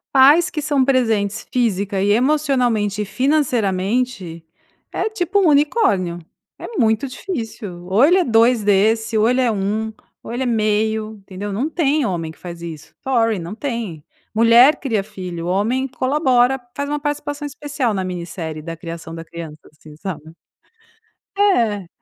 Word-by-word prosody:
Pais 295 +7 +6
que 305 - -4
são 285 -2 +2
presentes 225 -6 +1
física 205 -5 0
e 205 +1 +2
emocionalmente 245 -5 +1
e - - -6
financeiramente, 220 - 0 0.5
é - - -1
tipo 405 -2 0
um 380 - +4
unicórnio, 285 - +2 0.4
é - - -7
muito 220 +2 +2
difícil, 225 - -6
ou 200 +7 +3
ele 350 +6 +6
é 370 - +3
2 230 -1 +4
desse, 220 +3 +2
ou 220 +2 +4
ele 250 +1 +2
é 250 -2 +3
1 215 +2 -2 0.3
ou - - -8
ele 255 +2 -1
é - - -2
meio, 220 -1 0
entendeu? 195 +1 -6
Não 245 +9 -1
tem 305 -4 +1
homem 170 -5 -2
que 160 - -12
faz 170 -1 -9
isso, 160 -3 -9
sorry, 230 -6 +1
não 170 +5 -6
tem, 230 - -4 0.3
mulher 235 +6 +6
cria 230 -8 0
filho, 180 -3 -7
homem 225 +9 0
colabora, 260 -1 +2 0.2
faz 285 0 -3
uma 295 0 -1
participação 290 0 -3
especial 285 -5 -2
na 190 - -1
minissérie 170 -3 -5
da 165 +1 -6
criação 165 0 -8
da 165 - -7
criança, 165 -2 -9
assim 150 0 -15
sabe. 160 -2 -7 1.0
É 230 - +2
225 Hz, 155 wpm, -20 LUFS, 190-270 Hz, 1.0 s, Pais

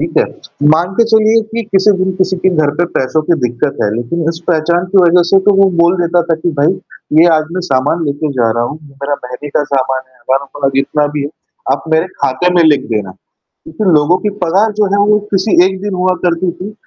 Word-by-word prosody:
ठीक - - -3
है। - - +3 0.5
मान 175 +4 -1
के 230 - +5
चलिए 220 0 +3
कि 230 +1 -3
किसी 195 +2 +4
दिन 190 0 -1
किसी 185 0 0
के 190 - +3
घर 150 -2 +2
पे 175 - +1
पैसों 135 +4 0
की 170 +3 +1
दिक्कत 125 +4 -2
है 105 - +1
लेकिन 120 +9 -3
इस 165 0 -3
पहचान 170 +1 +1
की 195 - +4
वजह 175 0 +4
से 195 - +6
तो - - +6
वो 195 0 +4
बोल 170 +2 +3
देता 175 0 +2
था - - +4
कि 175 - 0
भाई 150 - +3 0.5
ये 170 - +6
आज 155 0 +1
मैं - - -1
सामान 145 +3 0
लेके 145 +1 -2
जा 115 -2 +2
रहा - - +1
हूँ। 150 - -8
मेरा 140 0 -5
महीने 125 +4 -7
का 145 - +1
सामान 135 -2 -1
है, 130 - -31
हज़ारों 135 +3 -2
का - - -14
मतलब 135 - 0
जितना 145 +2 +1
भी 145 - -1
है, 140 - -3 0.4
आप - - -3
मेरे 160 +2 +1 0.2
खाते 180 +8 +1
में 175 - +4
लिख 145 -4 +3
देना। 105 -3 -2 0.6
लेकिन 180 +6 -4
लोगों 150 +5 +2
की 210 - -2
पगार 195 +6 +1
जो 210 - +3
है 200 - +2
वो 210 - +4
किसी 195 +2 +1
एक 190 0 -2
दिन 205 -2 -3
हुआ 185 0 +1
करती 175 +1 0
थी 200 +4 -6
165 Hz, 240 wpm, -13 LUFS, 140-185 Hz, 0.6 s, से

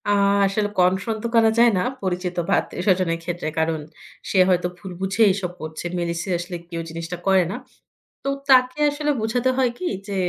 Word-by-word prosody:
আ - - +1 0.4
আসলে 205 +1 0
কনফ্রন্ট 190 +5 +2
তো - - 0
করা 225 -1 +6
যায় 235 0 +7
না 180 - +1 0.2
পরিচিত 180 -1 -2
বা - - +1
আত্মীয় 180 - -6
স্বজনের 180 -3 +2
ক্ষেত্রে। 175 -1 -4
কারণ 160 0 0 0.5
সে 190 - +2
হয়তো 180 -1 +2
ভুল 185 +1 -9
বুঝে 195 +4 +2
এসব 185 -2 -3
করছে। 155 +2 -6
মেইনলি 170 -1 -2
সিরিয়াসলি 175 -1 -3
কেউ 170 -1 -4
জিনিসটা 165 +2 -6
করে 190 -1 +5
না। - - -4 0.7
তো - - -1 0.2
তাকে 255 0 +5
আসলে 295 +1 -2
বুঝাতে 245 +4 +1
হয় 255 -2 +3
কি 365 - -4 0.2
যে 200 - -3
185 Hz, 185 wpm, -22 LUFS, 175-220 Hz, 0.7 s, যায়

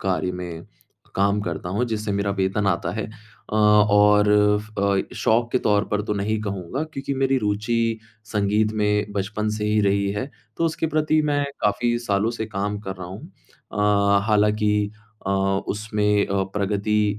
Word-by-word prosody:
कार्य 95 -1 -1
में 90 -2 -7 0.5
काम 100 +1 +2
करता 90 -3 -4
हूँ, 120 +4 +1
जिससे 105 -1 -2
मेरा 100 0 0
वेतन 95 +2 0
आता 90 -2 0
है। 110 - -3
अ, 110 -1 -13
और 105 -1 +5 0.3
फ 105 0 -12
अ, 100 -1 0
शौक 120 +1 +2
के 130 - +3
तौर 105 0 +3
पर 105 0 0
तो 105 - -2
नहीं 105 +2 -1
कहूँगा, 100 - -4
क्योंकि 135 0 -3
मेरी 135 0 +2
रुचि 105 +2 0 0.5
संगीत 105 +1 +1
में 105 0 +1
बचपन 105 +2 -2
से 105 - -2
ही 105 0 +2
रही 100 0 +2
है, 130 +7 -4 0.3
तो 165 - 0
उसके 160 0 0
प्रति 155 0 +3
मैं 145 0 +1 0.2
काफ़ी 120 +3 +1
सालों 105 -1 0
से 110 - -2
काम 105 0 -3
कर 95 - -4
रहा 90 -1 -7
हूँ। 95 +2 -9 0.5
अ, 100 -1 +3
हालाँकि 105 -1 +2 0.4
अ, - - 0 0.4
उसमें 105 0 +1
अ, 100 -1 0
प्रगति 105 +1 0
105 Hz, 170 wpm, -23 LUFS, 100-110 Hz, 0.5 s, और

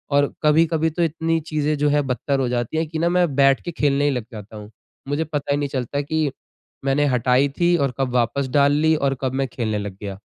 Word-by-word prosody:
और 145 0 +2
कभी-कभी 160 +1 +3
तो 170 +2 -1
इतनी 165 0 0
चीज़ें 150 -1 0
जो 145 +1 +2
है 145 0 +3
बत्तर 135 +1 -1
हो 130 - 0
जाती 120 +4 -2
है 160 - +1
कि 160 +1 -5
न 170 - +2
मैं 180 0 +3
बैठ 135 -1 +4
के 175 - -4
खेलने 145 -3 +1
ही 145 - +3
लग 125 -4 -3
जाता 110 0 -10
हूँ। 105 0 -10 0.4
मुझे 145 +3 0
पता 145 -2 -3
ही 140 - +2
नहीं 145 -1 -2
चलता 130 +2 -2
कि 155 -1 -1 0.5
मैंने 140 +2 +2
हटाई 125 +3 +2
थी 175 0 +4
और 140 -5 0
कब 130 -2 -1
वापस 125 +3 +1
डाल 140 -1 +4
ली 155 +2 +3
और 140 -3 0
कब 130 -1 -1
मैं 135 0 0
खेलने 115 -3 -3
लग 100 -2 -6
गया। 100 -2 -6
140 Hz, 240 wpm, -22 LUFS, 130-155 Hz, 0.5 s, बैठ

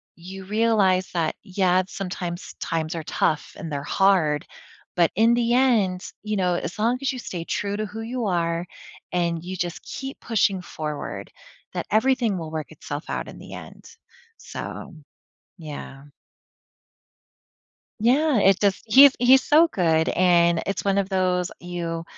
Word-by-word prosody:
you 190 +2 -10
realize 205 -3 +2
that, 165 -3 -1
yeah, 185 -1 +2
sometimes 180 -3 -5
times 165 0 -2
are 160 - -4
tough 150 -1 -1
and 165 -6 -7
they're 140 0 -3
hard, 175 -6 +2 0.5
but 170 -2 +3
in 225 +3 +4
the 240 0 +1
end, 220 -8 +3 0.2
you 210 -1 -2
know, 180 -2 +1
as 180 - -4
long 235 +3 +2
as 275 - 0
you 255 - -6
stay 175 -7 -5
true 200 +3 -2
to 215 - -2
who 215 +2 -7
you 240 +1 -3
are 170 -1 0 0.5
and 170 -2 -1
you 185 +1 -5
just 175 -1 -4
keep 270 0 -7
pushing 200 -4 +1
forward, 155 -4 -6 0.4
that - - -4
everything 230 -2 +2
will 160 -2 -6
work 155 -1 -5
itself 145 0 -7
out - - -3
in - - -10
the - - -11
end - - -11 0.5
so, 190 - -7 0.6
yeah. 145 -4 -9 2.0
Yeah, 270 +2 +3
it 195 -1 +4
does 200 -2 +2
he's 270 +5 +8
he's 255 +2 +6
so 320 +3 +5
good, 160 - +1
and 170 -2 +3
it's 195 -1 -2
one 195 0 +2
of 195 0 0
those 185 -1 +1
you 170 -2 -4
185 Hz, 155 wpm, -24 LUFS, 170-220 Hz, 2.0 s, he's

